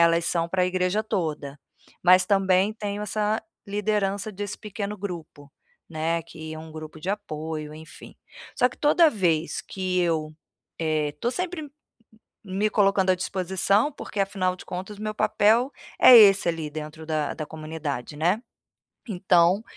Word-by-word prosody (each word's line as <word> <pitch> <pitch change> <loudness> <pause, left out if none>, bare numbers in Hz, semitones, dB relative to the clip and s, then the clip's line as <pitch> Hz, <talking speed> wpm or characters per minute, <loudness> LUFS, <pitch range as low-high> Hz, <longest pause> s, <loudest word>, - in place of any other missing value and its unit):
elas 170 0 +4
são 165 -1 +1
pra 180 0 +1
igreja 185 +3 0
toda, 150 -8 -3 0.4
mas 185 +1 +6
também 195 0 +3
tenho 205 -1 -4
essa 210 +1 -1 0.2
liderança 205 0 -1
desse 205 0 -5
pequeno 210 0 -5
grupo, 165 -7 -7 0.4
né, 165 +1 -1
que 160 -1 -9
é 155 - -7
um 160 0 -10
grupo 155 0 -9
de 180 - -6
apoio, 155 -6 -5
enfim. 155 0 -12 0.4
Só 250 - +3
que - - -15
toda 315 +2 +5
vez 170 - 0
que 185 -1 -2
eu 155 -3 -1 0.5
eh, 155 -2 0
tô 240 - 0
sempre 345 -1 -4 0.7
me 195 +2 -1
colocando 195 -2 +3
à - - +2
disposição, 190 - +1
porque 240 -6 -7
afinal 195 -2 0
de - - -13
contas 190 +3 -6
o 210 - -11
meu 215 0 -3
papel 225 +5 +3 0.3
é 250 - +10
esse 200 -4 +7
ali 160 -2 -3
dentro 155 +1 -8
da 155 -2 -1
da 155 - -5
comunidade, 155 -3 -5
né. 180 +8 +1 0.7
Então, 180 +1 +3
185 Hz, 150 wpm, -25 LUFS, 160-205 Hz, 0.7 s, é